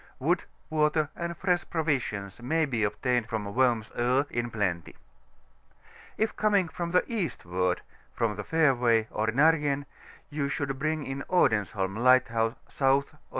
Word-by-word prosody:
Wood, - - 0 0.3
water, 150 -1 +2
and 170 -1 -4
fresh 180 -1 +1
provisions 125 - -2
may 160 +6 +1
be 120 -6 -1
obtained 120 +3 0
from 105 -3 -3
Worms 120 -4 +2
Oe 125 +4 +2
in 120 0 -2
plenty. 95 -7 -2 1.2
K 220 - +2
coming 205 -5 +2
from 170 +1 -4
the 180 +1 +3
eastward, 90 - -2 0.4
from^ 110 -2 0
the 105 - -5
fairway, 125 -8 +3
or 110 +1 -1
Nargen, 145 +2 +2 0.5
you 145 -1 -1
should 135 -1 -3
bring 155 +1 -1 0.2
Odens 110 - +2
holm 95 -2 -2
LightSouse 115 -2 +3
South 135 +2 +1
or - - -21
S. - - -31
130 Hz, 145 wpm, -28 LUFS, 110-155 Hz, 1.2 s, the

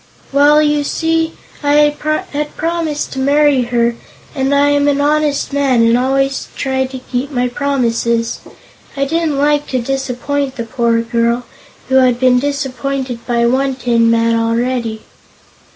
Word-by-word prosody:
"Well, 295 +2 +5
you 295 -1 +1
see 325 +2 0 0.3
I 290 -1 +1 0.6
had 295 +1 -4
promised 325 -2 -2
to 265 - -4
marry 285 0 +3
her, 235 -1 0 0.4
and 270 -1 -1
I 285 0 +3
am 285 0 +2
an 285 -1 +2
honest 295 -1 0
man 270 -4 +2
and 230 0 +4
always 270 +2 0
try 265 -1 -1
to 260 0 -8
keep 255 +1 -4
my 250 -3 0
promises. 235 -4 -1 0.6
I 275 - +1
didn't 320 -1 -1
like 295 +1 +1
to 255 - -1
disappoint 270 +2 -2
the 235 - -4
poor 230 0 0
girl, 235 +1 0 0.5
who 265 - +4
had 250 -2 +3
been 250 -1 +4
disappointed 270 -3 -3
by 235 -1 +1
one 265 +2 +1
tin 235 -2 +2
man 230 0 +2
already." 230 0 -1
265 Hz, 150 wpm, -15 LUFS, 240-285 Hz, 0.6 s, Well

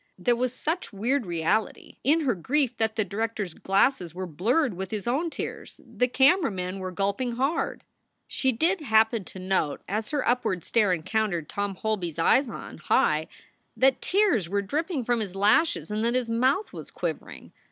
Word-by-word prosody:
There 245 -1 +2
was 250 +1 0
such 315 +6 -3
weird 235 +3 -1
reality 170 +6 -1
in 310 +6 +3
her 265 -5 +1
grief 255 - 0
that 220 0 0
the 215 -2 0
director 220 +2 -2
s 175 -4 -8
glasses 190 - +1
were 185 +1 -4
blurred 225 - +1
with 190 +1 -5
his 210 -2 -4
own 280 +8 0
tears; - - -7
the 250 - 0
camera 275 +8 +4
men 185 -1 -4
were 185 0 -4
gulping 200 +6 -1
hard. 275 +7 -1 0.4
She 265 - 0
did 330 - +1
happen 220 -4 +3
to - - -12
note, 185 -5 -1
as 215 +3 -2
her 290 -2 -1
upward 235 -8 0
stare 215 -5 +2
encountered 180 -1 -1
Tom 200 -1 -3
Holby 210 -3 -2
s 160 - -13
eyes 250 - +3
on - - -8
high, - - +2 0.5
that 265 0 +3
tears 365 - +2
were 200 +1 0
dripping 300 - -2
from 240 0 +1
his 195 -4 -4
lashes 210 +7 +2
and 215 +1 -1
that 235 +1 +1
his 245 -2 -1
mouth 260 - +1
was - - -8
quivering. - - -5
225 Hz, 185 wpm, -26 LUFS, 195-265 Hz, 0.5 s, camera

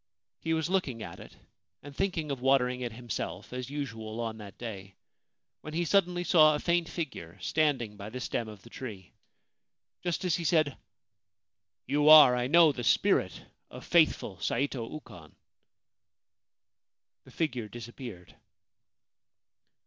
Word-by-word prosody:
He 160 0 -1
was 160 0 -1
looking 160 - -1
at 85 - -9
it, - - -13 0.5
and 145 0 -11
thinking 175 -5 -1
of 135 -3 -4
water 135 -1 +4
ing 125 0 -5
it 120 -1 -3
himself, 120 +1 -6
as 125 0 -5
usual 115 -6 -5
on 115 -1 -3
that 100 -2 -11
day, 100 -5 -8 0.7
when 155 +1 -8
he 170 +1 0
suddenly 175 0 +2
saw 155 -4 +6
a - - -2
faint 170 0 +1
figure 100 - -6
standing 125 - 0
by 100 +1 -7
the 125 +3 -6
stem 120 -2 -3
of 105 -3 -11
the 115 - -14
tree. 95 - -8 0.9
Just 175 +1 -2
as 180 - +2
he 170 - -4
said, 155 -3 +2 0.6
' - - -61
You 145 +3 +3
are, 150 -5 +10
I 125 0 0
know, 165 +2 +6
the 125 -3 -6
spirit - - +2 0.3
of - - -11
faithful 155 - +2
Saito 130 -3 -2
Ukon/ 90 - -11 1.9
the - - -17
figure 125 -9 -2
disappeared. 110 - -10
130 Hz, 150 wpm, -29 LUFS, 110-155 Hz, 1.9 s, are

